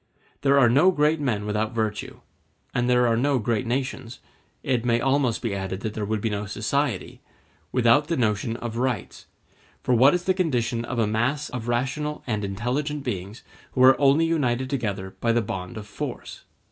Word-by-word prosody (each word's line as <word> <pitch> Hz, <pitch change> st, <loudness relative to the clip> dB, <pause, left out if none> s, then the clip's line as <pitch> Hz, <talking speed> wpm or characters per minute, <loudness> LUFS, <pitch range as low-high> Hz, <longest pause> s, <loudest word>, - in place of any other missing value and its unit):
There 140 Hz, 0 st, +4 dB
are 130 Hz, -3 st, +6 dB
no 140 Hz, +10 st, +5 dB
great 155 Hz, -2 st, +2 dB
men 115 Hz, -8 st, -1 dB
without 105 Hz, +2 st, -2 dB
virtue, 110 Hz, -2 st, -3 dB, 0.5 s
and 120 Hz, +1 st, 0 dB
there 125 Hz, 0 st, +4 dB
are 115 Hz, -1 st, +3 dB
no 135 Hz, +4 st, +2 dB
great 115 Hz, 0 st, -1 dB
nations—it 125 Hz, 0 st, -4 dB
may 120 Hz, -1 st, +2 dB
almost 135 Hz, -3 st, +1 dB
be 115 Hz, -4 st, -1 dB
added 95 Hz, 0 st, -4 dB
that 110 Hz, -, -3 dB
there 105 Hz, -1 st, -3 dB
would 110 Hz, -1 st, -1 dB
be 115 Hz, -, 0 dB
no 105 Hz, 0 st, -3 dB
society—without 125 Hz, +2 st, -1 dB
the 165 Hz, -, -1 dB
notion 115 Hz, -1 st, 0 dB
of 120 Hz, -2 st, -5 dB
rights; 125 Hz, -5 st, -3 dB, 0.6 s
for 125 Hz, -, +1 dB
what 130 Hz, +7 st, +6 dB
is 175 Hz, -, -2 dB
the 185 Hz, -, +2 dB
condition 120 Hz, -10 st, 0 dB
of 130 Hz, -, -4 dB
a 115 Hz, -, +3 dB
mass 125 Hz, +8 st, -1 dB
of 120 Hz, -2 st, -5 dB
rational 135 Hz, +5 st, -2 dB
and 110 Hz, -4 st, -2 dB
intelligent 130 Hz, +9 st, -2 dB
beings 100 Hz, -3 st, -5 dB, 0.3 s
who 130 Hz, -, +3 dB
are 130 Hz, +2 st, +6 dB
only 140 Hz, +4 st, +5 dB
united 130 Hz, -6 st, 0 dB
together 100 Hz, -8 st, -3 dB
by 115 Hz, -, +2 dB
the 115 Hz, -, +3 dB
bond 105 Hz, -1 st, -5 dB
of 105 Hz, -, -7 dB
force? 105 Hz, -, -7 dB
120 Hz, 180 wpm, -24 LUFS, 110-135 Hz, 0.6 s, are